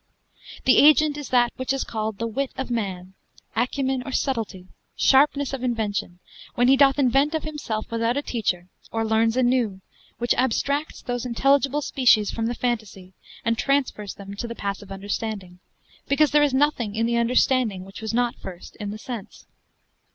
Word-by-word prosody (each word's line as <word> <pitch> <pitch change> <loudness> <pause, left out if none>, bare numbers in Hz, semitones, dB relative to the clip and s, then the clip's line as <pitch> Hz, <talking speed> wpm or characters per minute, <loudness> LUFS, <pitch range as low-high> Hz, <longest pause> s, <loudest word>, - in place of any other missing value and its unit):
The 260 - +6
agent 305 0 +6
is 290 -2 -7
that 240 -1 +3
which 260 0 -2
is 270 -1 0
called 220 -2 -4
the 230 - -2
wit 260 +4 -2
of 265 -2 -4
man, 190 -5 -3 0.4
acumen 260 +2 0
or 270 - -6
subtlety, 225 -9 -2 0.3
sharpness 280 0 +3
of 265 -2 -4
invention, 215 -7 -2 0.4
when 245 0 +3
he 270 - +6
doth 270 0 +5
invent 275 +3 +3
of 315 - -2
himself 275 -9 -4
without 230 +2 0
a 285 - -1
teacher, 185 -9 -2 0.2
or 225 0 -1
learns 225 +2 +2
anew, 245 -6 +1 0.4
which 240 0 +1
abstracts 280 +4 -1
those 245 -1 -3
intelligible 275 +4 +2
species 235 -7 +3
from 225 0 -2
the 240 - -2
phantasy, 215 -6 -3 0.3
and 230 0 +1
transfers 265 -7 0
them 200 0 -9
to 235 - -4
the 235 - -6
passive 200 -1 -5
understanding, 195 -2 -5 0.5
because 295 +1 +3
there 295 0 +5
is 295 -1 +3
nothing 260 -6 +1
in 225 +1 +1
the 235 0 +1
understanding, 235 -4 +2
which 195 +3 -11
was 220 - -3
not 240 +1 +1
first 180 -2 -10
in 205 -2 -5
the 210 - -5
sense. 230 -2 -8
240 Hz, 175 wpm, -24 LUFS, 215-270 Hz, 0.5 s, The